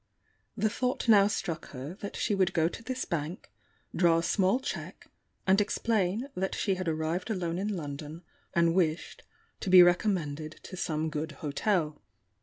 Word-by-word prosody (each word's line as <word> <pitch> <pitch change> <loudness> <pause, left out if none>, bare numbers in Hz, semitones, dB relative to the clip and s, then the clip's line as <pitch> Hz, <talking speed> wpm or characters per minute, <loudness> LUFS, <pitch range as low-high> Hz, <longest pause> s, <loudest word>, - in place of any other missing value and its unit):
The 215 +1 +2
thought 250 +1 -1
now 205 -3 +7
struck 175 -5 -3
her 135 +4 -7
that 200 - -5
she - - 0
would 190 -1 +2
go 165 -1 +3
to 180 - -6
this 255 +3 -3
bank, 170 +4 -4 0.4
draw 170 -2 +4
a 165 - 0
small 195 +7 +2
cheque, 270 - -6 0.4
and 195 +2 +4
explain 210 +2 0
that 190 +1 -2
she 200 - +1
had 185 -1 -4
arrived 160 +4 -1
alone 175 -4 -2
in 205 0 -2
London, 150 +2 -7 0.3
and 170 -1 +4
wished 170 -3 0 0.4
to - - -3
be 180 -1 +10
recommended 165 -5 +1
to - - -8
some 160 -3 -2
good 155 +1 -3
hotel. 150 +2 -1
180 Hz, 165 wpm, -29 LUFS, 160-200 Hz, 0.4 s, be